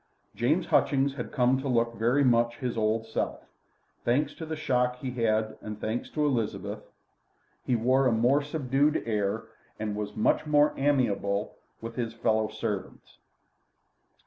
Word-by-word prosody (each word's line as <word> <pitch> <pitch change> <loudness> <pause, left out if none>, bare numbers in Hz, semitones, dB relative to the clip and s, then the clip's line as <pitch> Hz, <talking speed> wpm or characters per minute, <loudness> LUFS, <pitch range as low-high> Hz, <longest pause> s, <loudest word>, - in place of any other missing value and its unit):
James - - +1
Hutchings 140 0 +2
had 125 -4 -6
come 130 0 +2
to 135 - -4
look 115 -2 +1
very 120 +5 +2
much 120 -2 +3
his 125 0 -3
old 110 0 0
self. 110 - -3 0.6
Thanks 130 +6 +1
to 160 - -8
the 160 - -3
shock 125 -4 +1
he 125 0 -5
had 120 -2 -1 0.2
had 110 0 -13
and 105 -1 -7
thanks 110 +3 -3
to 150 -1 0
Elizabeth, 120 -7 -1 0.8
he 125 - +1
wore 130 +4 +3
a - - +3
more 120 +6 +3
subdued 145 0 +1
air, 105 -1 -1 0.3
and 105 -1 -3
was 105 0 -4
much 110 - +1
more 150 0 +4
amiable 110 -7 0 0.3
with 115 +1 -7
his 115 -2 -3
fellow 110 -1 +1
servants. 105 -3 -5
120 Hz, 155 wpm, -28 LUFS, 110-135 Hz, 0.8 s, more